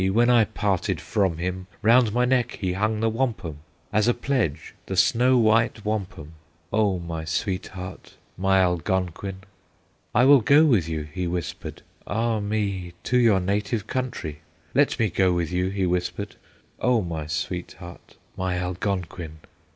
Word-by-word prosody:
when 120 +3 +4
I 115 -3 +5
parted 100 -3 -1
from 95 -6 0
him, 90 +2 -4 0.2
Round 115 0 +5
my 125 +3 +2
neck 125 -1 +1
he 95 -4 -1
hung 110 +3 0
the 115 - +2
wampum, 110 - -2 0.3
As 105 +1 +3
a 120 - +3
pledge, 120 - -1
the 95 - -3
snow 125 +5 +4
white 115 -1 +2
wampum, 95 -7 -4 0.4
O 105 -3 +2
my 85 -2 -5
sweetheart, 90 +2 -4 0.2
my 95 +1 +3
Algonquin! 95 +2 -1 0.7
"'I 120 +3 +5
will 140 -1 +7
go 145 +8 +6
with 105 - +3
you,' 80 -2 -2
he 90 0 -2
whispered, 85 -1 -5 0.2
'Ah 115 0 0
me! 100 -4 -2
to 125 - +2
your 115 -5 +4
native 100 +3 -1
country; 120 - -4 0.3
Let - - +3
me 115 - +2
go 95 +1 +2
with 85 -1 -1
you,' 90 +1 0
he 95 -1 -1
whispered, 90 +3 -2 0.4
'O 125 -4 +2
my 80 -3 -4
sweetheart, 75 - -6 0.2
my 90 -1 -1
Algonquin! 90 -3 -3
95 Hz, 150 wpm, -24 LUFS, 90-115 Hz, 0.7 s, will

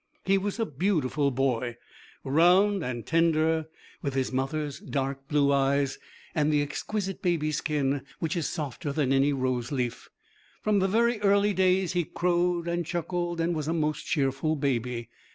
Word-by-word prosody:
He 195 +1 +3
was 205 +3 -3
a 225 - +2
beautiful 150 -4 0
boy, 125 -2 -1 0.5
round 180 +7 +4
and 120 -4 -4
tender, 160 -1 +2 0.3
with 140 -3 -3
his 130 -1 0
mother's 145 +2 -2
dark 135 -1 -3
blue 145 -2 +3
eyes, 140 0 +1 0.3
and 150 0 +2
the 145 -1 +3
exquisite 195 +6 -4
baby 165 -4 +1
skin 145 -2 0 0.2
which 165 +2 -2
is 165 -5 -1
softer 145 -1 -4
than 140 -2 +1
any 135 +2 +3
rose 130 -2 -1
leaf. 125 -4 -3 0.5
From 210 -1 +3
very 230 +1 +2
early 200 0 +3
days 185 -1 +2
he 175 -1 +1
crowed 175 0 0
and 170 0 0
chuckled 175 +1 -2
and 165 +1 +1
was 155 -2 -3
a 165 - 0
most 155 -3 -1
cheerful 140 +2 0
baby. 125 -4 -2
155 Hz, 155 wpm, -27 LUFS, 135-175 Hz, 0.5 s, round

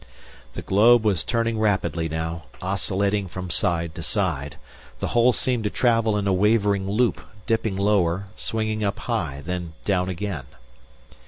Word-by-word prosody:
The - - -6
globe 110 +4 +5
was 95 -7 +2
turning 115 -2 0
rapidly 95 -6 0
now, 80 +1 -4
oscillating 100 +1 -1
from 90 0 -6
side 85 -2 +2
to 85 - -7
side. 80 - -2 0.4
The - - -3
hole 120 +1 +4
seemed 125 -2 -1
to - - +2
travel 115 -3 +2
in 100 - -1
a 100 - +2
wavering 100 -1 +2
loop, 115 +4 +1 0.2
dipping 110 -3 0
lower, 100 -2 +1
swinging 110 -1 -2
up 100 0 -1
high, 80 - -3
then 90 -2 -4
down 95 -2 +1
again. 90 -6 -4
100 Hz, 150 wpm, -24 LUFS, 90-110 Hz, 0.4 s, globe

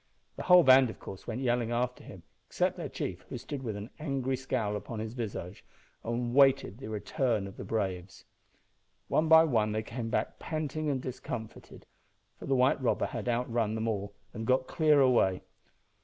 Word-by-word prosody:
The - - -6
whole 180 -1 +7
band, 130 -2 +7
of - - -8
course, 95 - -10
went 120 +2 -3
yelling 120 -2 0
after 125 +1 -2
him, - - -12 0.2
except - - 0
their - - -5
chief, - - -5
who - - -5
stood 145 -3 -6
with 115 -5 -4
an 105 +4 -7
angry 135 -3 -1
scowl 115 -5 -2
upon 110 +2 -6
his 110 +1 -5
visage, 100 -6 -6 0.4
and 120 +1 -2
awaited 135 -5 +4
the 135 - -7
return 110 0 -1
of 95 - -10
his - - -7
braves. 95 -4 -3 0.8
One 160 - +2
by 160 0 +8
one 110 -8 +1
they 110 0 -1
came 115 +1 -5
back - - -2
panting 155 -1 -3
and 130 -3 -1
discomfited, 125 -3 -7 0.5
for - - -8
the 135 - +2
white 130 +2 +3
robber 125 - +1
had - - -4
outrun 115 -2 0
them 110 0 -2
all 100 -2 -3 0.2
and 110 +1 -5
got 130 0 +3
clear 155 -1 +3
away. 120 -8 +3
120 Hz, 185 wpm, -30 LUFS, 110-135 Hz, 0.8 s, by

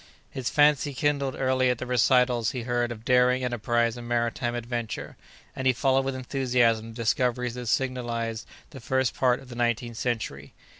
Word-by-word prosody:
His 130 -2 -3
fancy 145 -1 +3
kindled 140 -1 0
early 130 -1 +1
at 125 - +1
the 130 - -5
recitals 125 -1 +3
he 125 -3 -4
read 120 0 -1
of 115 -1 -8
daring 125 0 +3
enterprise 120 -1 0
and 120 -1 -8
maritime 120 0 -1
adventure, 120 -1 -4 0.4
and 130 - -1
he 130 - +5
followed 135 +1 +2
with 135 -1 -2
enthusiasm 125 -4 +1
the 115 - -11
discoveries 125 +1 0
that 125 -1 -6
signalized 115 -2 -2 0.2
the 135 - -9
first 130 +2 0
part 125 0 +2
of 135 - -15
the 120 - -8
nineteenth 120 -1 -1
century. 110 - -3
125 Hz, 170 wpm, -26 LUFS, 120-130 Hz, 0.4 s, he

